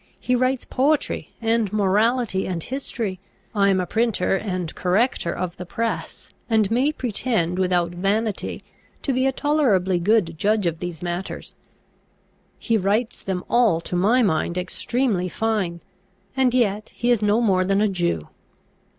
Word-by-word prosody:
He 250 - +1
writes 255 +1 +1
poetry, 290 +3 0
and 225 -3 +1
morality, 210 +1 +1
and 170 -3 -3
history: 230 -7 -4 0.3
I 200 -2 +3
am 190 -1 +3
a 180 - 0
printer, 225 0 +1
and 185 -4 -3
corrector 190 0 +1
of 180 -2 -4
the 180 - -6
press, 230 +5 -4 0.2
and 220 -2 +2
may 260 +6 +3
pretend 220 - -1
without 180 -2 +1
vanity 200 +4 -1 0.4
to 275 - 0
be 260 +1 +2
a - - +2
tolerably 240 - +2
good 175 -4 +1
judge 210 -1 +2
of 165 -1 -1
these 175 -2 -6
matters: 175 +2 -5 1.0
he 230 -2 +1
writes 210 +4 0
them 185 -2 -3
all 235 -9 +3
to 180 - -5
my 220 +8 +3
mind 175 -2 0
extremely 195 0 -1
fine; 195 -4 -1 0.5
and 255 -2 +2
yet 215 -4 +1
he 245 0 +1
is 235 -3 +3
no 210 +2 +3
more 195 -6 +3
than 195 +1 +1
a 215 - +3
Jew." 175 - -1
205 Hz, 150 wpm, -23 LUFS, 180-235 Hz, 1.0 s, I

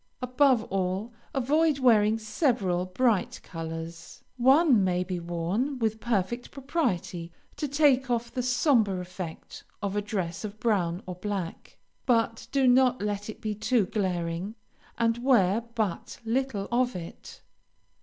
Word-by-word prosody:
Above 255 -1 +3
all, 195 +4 -1 0.2
avoid 295 +3 +2
wearing 220 -4 +4
several 215 - 0
bright 215 +1 +1
colors. 165 0 -7
One 265 - +5
may 180 -1 +1
be 180 -1 -4
worn 175 +11 -2
with 220 -2 -1
perfect 235 +1 -1
propriety 240 - -2 0.3
to 300 - -2
take 275 -2 +3
off 235 -1 -1
the 255 - -1
sombre 245 - +2
effect 180 -2 -8 0.2
of 200 -1 -3
a 205 - +1
dress 195 -5 -3
of 215 0 -6
brown 185 -6 0
or 185 - -5
black, 185 -2 -5 0.3
but 230 -2 +1
do 275 -1 +2
not 255 0 +4
let 205 0 -3
it 220 - -8
be 215 -1 -2
too 215 +1 +1
glaring, 180 0 -2 0.4
and 230 0 +1
wear 230 -5 +3
but 215 -6 -2
little 230 -4 -1
of 245 -1 +1
it. 170 -2 -9
215 Hz, 135 wpm, -27 LUFS, 185-250 Hz, 0.4 s, One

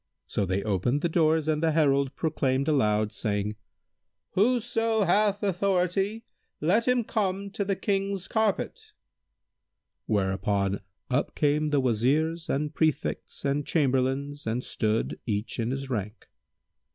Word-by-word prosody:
So 100 - -1
they 95 +2 0
opened 110 +7 0
the 170 - +1
doors 160 -1 +2
and 155 -1 +1
the 160 -1 +2
herald 140 -3 +2
proclaimed 135 -4 0
aloud, 105 -7 +2
saying, 105 0 -1 0.8
"Whoso 225 0 +2
hath 205 +1 +2
authority, 195 +3 0 0.3
let 205 +10 +2
him 250 -1 +3
come 200 -2 -1
to 200 - -2
the 195 0 0
King's 195 -1 -1
carpet[FN#164]!" 220 -3 -1 1.1
Whereupon 100 0 0 0.3
up 125 - 0
came 150 +1 +2
the 145 -1 +2
Wazirs 145 +8 +1
and 150 +2 -1
Prefects 155 -2 -1
and 140 +1 +1
Chamberlains 140 -1 0
and 120 +3 -1
stood, 110 0 -1
each 105 +2 -2
in 115 0 0
his 135 +1 -3
rank. 105 -1 -4
150 Hz, 130 wpm, -27 LUFS, 120-195 Hz, 1.1 s, him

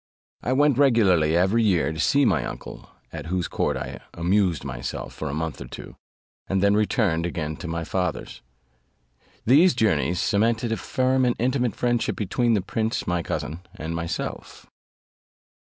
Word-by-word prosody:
I 125 - -2
went 145 -1 +3
regularly 95 - +4
every 95 +6 +3
year 95 -7 +2
to 80 - -7
see 140 - +3
my - - +2
uncle, - - -8 0.2
at - - -6
whose 90 0 -1
court - - -1
I - - -6 0.2
amused 90 -3 +1
myself - - -5
for 80 - -5
a - - -4
month 80 -2 -4
or - - -7
two, - - -10 0.5
and 95 - 0
then 100 +1 +3
returned 100 -6 +1
again 80 -2 -3
to - - -7
my 85 0 -3
father's. 90 0 -3 1.0
These 145 +6 +5
journeys 105 -6 +1
cemented 115 +3 +1
a 115 - 0
firm 130 0 +1
and 125 -1 +2
intimate 125 -1 0
friendship 120 -1 0
between 115 +3 +1
the 100 - 0
prince 110 +3 -2
my 90 -1 0
cousin 80 0 -4 0.2
and 85 -3 -5
myself. 85 0 -5
100 Hz, 160 wpm, -24 LUFS, 85-120 Hz, 1.0 s, These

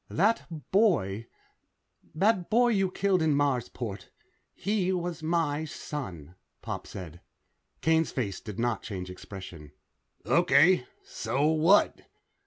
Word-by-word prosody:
"That 215 +6 +1 0.2
boy 125 - +2 0.9
that 190 +1 +2
boy 240 +3 +4
you 195 -4 +2
killed 185 -1 +1
in 155 -2 +2
Marsport. 120 - -2 0.5
He 200 -2 0
was 175 -2 -3
my 155 -2 0
son," 95 - -7 0.3
Pop - - -5
said. 85 -2 -9 0.6
Kane's 160 -1 +2
face 100 -8 -3
did 105 -3 -8
not 120 -2 0
change 90 -4 -6
expression. 90 -6 -10 0.5
"Okay. 155 0 +4 0.2
So 140 +3 -2
what?" 160 +6 +4
150 Hz, 110 wpm, -28 LUFS, -, 0.9 s, boy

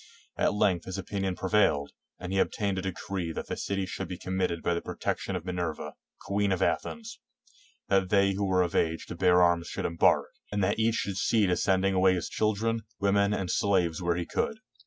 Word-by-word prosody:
At - - +1
length 90 -4 +2
his 95 0 -5
opinion 95 -1 -2
prevailed, 90 -8 +2 0.3
and 90 +1 -6
he 95 - +2
obtained 100 -2 0
a - - -2
decree 95 -1 -4
that - - -5
the - - -4
city 100 -1 -2
should 95 0 -5
be 90 0 -6
committed 95 -2 -2
to 85 - +1
the 85 - -2
protec - - -3
tion 100 - -4
of 90 -1 -5
Minerva, 90 -4 -3 0.3
''queen 100 0 +1
of 95 0 +1
Athens"; 230 0 -2 0.7
that 95 -2 +2
they 100 0 +4
who 100 +1 -1
were 90 -1 +3
of 85 - -3
age 80 0 0
to - - -5
bear 90 0 +4
arms 85 -1 +2
should - - -4
embark, 85 0 +3 0.2
and 100 -1 0
that 100 +4 +1
each 110 0 +2
should 100 -4 -2
see 110 +1 +3
to 90 -1 +2
sending 95 0 +2
away 95 0 +4
his 90 - -3
children, 110 +2 0 0.2
women, 100 0 +2
and 95 -3 -1
slaves 90 -5 +1
where 85 -1 +1
he 90 -1 -2
could. 220 - -2
95 Hz, 210 wpm, -28 LUFS, 90-100 Hz, 0.7 s, they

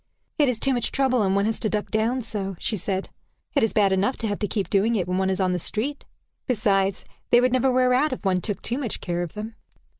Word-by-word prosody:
"It 290 -3 +4
is 245 - -1
too 270 +4 +1
much 240 -2 -1
trouble, 265 -3 +2
and 195 -1 +2
one 200 0 +2
has 225 0 -1
to 215 - +1
duck 210 0 -2
down 230 +4 +1
so," 200 -4 -4
she 220 - 0
said. 190 0 -3 0.5
"It 280 - +4
is 225 - +2
bad 200 -2 +3
enough 195 +7 +1
to 225 - -2
have 205 -1 -2
to 210 - -1
keep 200 -1 -2
doing 215 +4 +2
it 185 -5 0
when 180 +1 0
one 190 0 +1
is 190 - -1
on 185 -1 +2
the 180 - -1
street. 255 - -3 0.4
Besides, 200 -5 +1 0.2
they 240 - +6
would 250 0 +2
never 255 +1 +3
wear 255 0 +3
out 290 +5 +2
if 255 - -5
one 185 -1 +2
took 205 0 -4
too 245 +4 -1
much 245 -7 -4
care 175 -1 -2
of 175 -3 -5
them." 215 +2 -6
215 Hz, 265 wpm, -24 LUFS, 195-250 Hz, 0.5 s, they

